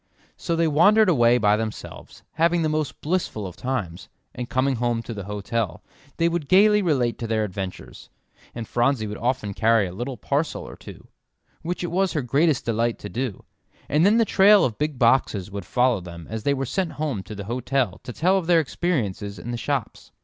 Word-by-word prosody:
So 170 - -2
they 165 0 +2
wandered 200 +8 +5
away 120 -6 +4
by 105 -3 +3
themselves, 110 -1 -7
having 170 +1 +2
the 155 - +1
most 155 -2 -2
blissful 155 - -2
of 90 - -7
times, 100 -9 -4 0.2
and 125 0 -6
coming 130 0 +1
home 120 -1 -1
to 115 - -6
the 100 -3 -7
hotel, 105 -2 -3 0.3
they 165 - +3
would 170 -4 -2
gaily 210 +2 +5
relate 135 -10 0
their 110 -2 -1
adventures; 95 -2 -7 0.5
and 115 -2 -5
Phronsie 120 -1 +1
would 105 0 -6
often 120 -4 -1
carry 115 0 +3
a 90 - -6
little 120 +6 -5
parcel 145 +3 -2
or - - -10
two, - - -13 0.5
which 175 +2 -4
it 175 - -3
was 190 +1 +1
her 150 -5 -1
greatest 140 +4 +1
delight 115 0 0
to 105 - -8
do; 120 -3 -4 0.4
and 150 +3 +2
then 205 +4 +5
the 230 - +4
trail 205 0 +6
of 115 -4 -3
big 150 -2 -1
boxes 115 -5 +2
would 100 -2 -6
follow 125 -3 +2
them 85 -2 -10
as 110 0 -3
they 140 +6 +1
were 135 0 -2
sent 180 +6 -2
home 145 -9 -3
to 100 +3 -9
the 100 - -6
hotel 125 -2 -1
to - - -7
tell 185 +9 +2
of 170 - -7
their 175 -2 +5
experiences 115 - -2
in 115 +7 -6
the - - -2
shops. 135 -1 -4
125 Hz, 200 wpm, -24 LUFS, 110-160 Hz, 0.5 s, trail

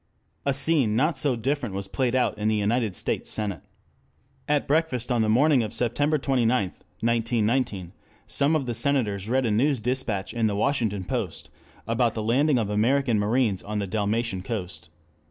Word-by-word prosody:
A 140 - +3
scene 140 -6 +3
not 150 +7 +2
so 135 -1 0
different 120 -3 -2
was 100 0 -4
played 125 +4 -1
in 110 -4 0
the 110 - +2
United 105 0 0
States - - -2
Senate. 105 -4 -2 0.9
At 150 -1 +1
breakfast 140 -5 0
on 120 -2 +2
the 110 - +1
morning 135 +4 +4
of 110 -2 -4
September 145 +6 +1
29, 130 -4 +1 0.2
1919, 115 0 -1 0.3
some 145 +3 +1
of 145 -4 0
the 120 - -2
Senators 110 -6 0
read 130 +1 +2
a 115 - +1
news 130 +5 +2
dispatch 115 -5 -2
in 115 -2 +1
the 105 - -1
Washington 110 -4 0
Post - - -4 0.4
about 115 +1 +1
the 110 - -2
landing 135 +5 +2
of 105 -3 -1
American 120 +2 +2
marines 105 -2 +1
on 105 +1 -5
the 100 - -1
Dalmatian 105 0 -1
coast. 90 -5 -6
115 Hz, 170 wpm, -25 LUFS, 105-135 Hz, 0.9 s, morning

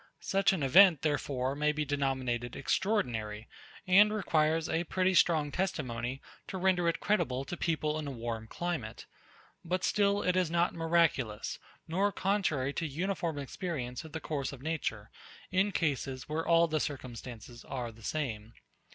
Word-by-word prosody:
Such 195 +2 +2
an 180 -7 -1
event, 175 +3 +7
therefore, 140 -3 0
may 150 +1 +2
be 150 0 -2
denominated 130 -4 -1
extraordinary, 115 - -1 0.4
and 200 +3 +6
requires 160 -6 +1
a 165 +2 0
pretty 185 +2 +1
strong 155 -5 +3
testimony, 125 -8 -2 0.2
to 190 - -5
render 180 -2 +2
it 170 - -2
credible 135 -11 0
to 175 - -5
people 155 -2 -1
in 150 - -4
a - - -3
warm 115 -3 -5
climate: 160 -7 -4 0.6
But 180 +2 -2
still 205 -1 +2
it 180 - +2
is 185 -3 +2
not 170 +1 +2
miraculous, 165 -10 +1 0.3
nor 195 +5 +1
contrary 175 -10 0
to 165 - -2
uniform 170 +1 -2
experience 135 -3 -4
of 160 - -11
the 160 - -4
course 145 -4 -3
of 135 -1 -10
nature 130 -10 -3 0.4
in 190 +3 +2
cases 135 -6 -1
where 160 +2 -2
all 170 0 +5
the 155 -1 0
circumstances 120 -4 -6
are 125 -3 -4
the 115 0 -17
same. 115 -5 -3
155 Hz, 155 wpm, -31 LUFS, 130-175 Hz, 0.6 s, event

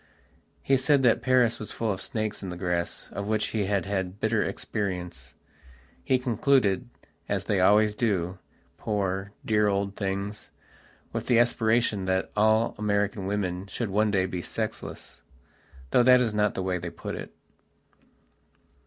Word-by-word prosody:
He 135 - +3
said 135 +1 +3
that 120 -3 +4
Paris 125 -3 +3
was 110 - -6
full 115 -2 -1
of 95 -1 -3
snakes 110 -4 -3
in 95 - -5
the 90 - -6
grass, 90 -1 -3
of 100 0 -4
which 110 0 0
he 105 -3 -1
had 100 -2 0
had 95 -1 -3
bitter 110 0 +1
experience. 90 - -4 0.7
He 130 - +3
concluded, 125 -2 +2 0.4
as - - 0
they 100 -3 0
always 105 +3 +5
do, 95 -5 -1 0.4
poor, 100 -2 -2
dear 105 -1 +3
old 100 0 -1
things, 100 +1 -4 0.6
with - - -3
the 120 - +4
aspiration 115 -3 +2
that 95 0 0
all 110 +2 +3
American 100 -2 0
women 95 -2 -2
should 110 0 -4
one 105 +2 +2
day 95 -2 +2
be 90 -1 -4
sexlessthough - - -5 0.7
that 125 +1 +6
is 115 -4 0
not 105 0 +1
the 95 - -2
way 90 -1 -1
they 85 0 -5
put - - -7
it.. - - -8
105 Hz, 155 wpm, -27 LUFS, 95-110 Hz, 0.7 s, that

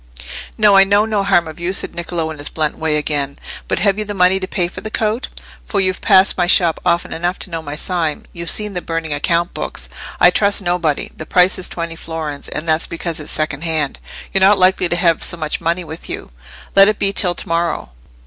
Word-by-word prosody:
"No, 210 -2 +5
I 195 - +8
know 205 +2 +3
no 215 -3 0
harm 185 -4 +2
of 160 +1 -9
you," 175 +2 -2
said - - -2
Niccolò, 170 -2 -3
in 155 - -9
his 145 - -5
blunt 155 -2 -1
way 160 -1 0
again. 145 -2 -2 0.3
"But - - 0
have 200 +2 +1
you - - 0
the 205 -1 -6
money 185 +1 +3
to 185 - -4
pay 180 -3 -1
for 175 - -9
the 215 - -5
coat? 220 +3 -1 0.4
For 205 - -2
you've 185 -1 0
passed 190 -2 +4
my 175 - +2
shop 170 -3 +4
often 175 -1 0
enough 175 +3 -2
to 185 - -6
know 165 -1 -3
my 145 -2 -6
sign: 165 -2 -2
you've 170 -1 -2
seen 210 +3 +2
the 180 - -3
burning 165 -2 -3
account 170 +4 0
books. - - -4 0.3
I - - +7
trust 200 -1 +2
nobody. 175 -4 -1
The 155 - -8
price 180 +1 +3
is 185 - -3
twenty 170 -1 -5
florins, 160 -3 -6
and 155 +3 -5
that's 160 0 +2
because 170 -1 -4
it's 150 - -5
second 155 -1 -1
hand. 155 -4 -1 0.3
You're 195 - +2
not 195 +2 +6
likely 185 -1 +3
to - - +1
have 170 -2 +2
so 175 - +1
much 155 0 -3
money 170 +2 0
with 160 0 -9
you. - - -6 0.4
Let 195 0 +8
it 215 0 +1
be 195 0 0
till 180 -3 +3
to - - -6
morrow." 170 - -1
175 Hz, 235 wpm, -17 LUFS, 160-190 Hz, 0.4 s, I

